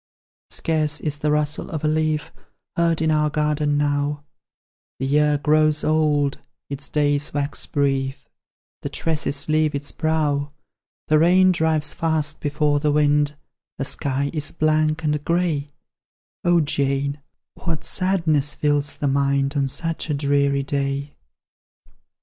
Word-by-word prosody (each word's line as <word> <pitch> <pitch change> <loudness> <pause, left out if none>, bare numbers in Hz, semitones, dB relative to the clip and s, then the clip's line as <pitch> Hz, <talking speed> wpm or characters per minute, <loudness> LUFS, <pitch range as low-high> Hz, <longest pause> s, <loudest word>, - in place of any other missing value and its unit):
"Scarce 155 -2 0
is 150 -2 -3
the 150 - 0
rustle 150 0 0
of 155 -2 -4
a - - +2
leaf 155 0 0 0.4
Heard 165 -1 +1
in 160 - +2
our 150 0 +2
garden 150 -1 0
now; 145 0 0 0.7
The 135 - -3
year 150 +1 +3
grows 155 +1 +2
old, 150 -2 +1 0.3
its 140 0 -4
days 145 -1 0
wax 145 0 -2
brief, 135 -2 -1 0.5
The - - -4
tresses 150 -3 -1
leave 155 -1 +2
its 140 0 -4
brow. 150 -3 0 0.6
The 155 0 +5
rain 185 +3 +5
drives 160 -3 +1
fast 155 -2 -1
before 150 0 +1
the 150 0 +1
wind, 145 0 +2 0.4
The 135 - -2
sky 140 +1 -1
is 155 -2 -3
blank 155 0 +1
and 150 -1 0
grey; 165 -4 0 0.7
O 175 -1 +4
Jane, 140 0 -1 0.3
what 160 -3 -4
sadness 165 -6 +1
fills 145 -1 0
the 145 - -2
mind 140 0 +1
On 140 -1 +1
such 165 +4 -3
a 150 - +1
dreary 140 -1 +1
day!" 140 +1 -2
150 Hz, 135 wpm, -22 LUFS, 145-155 Hz, 0.7 s, The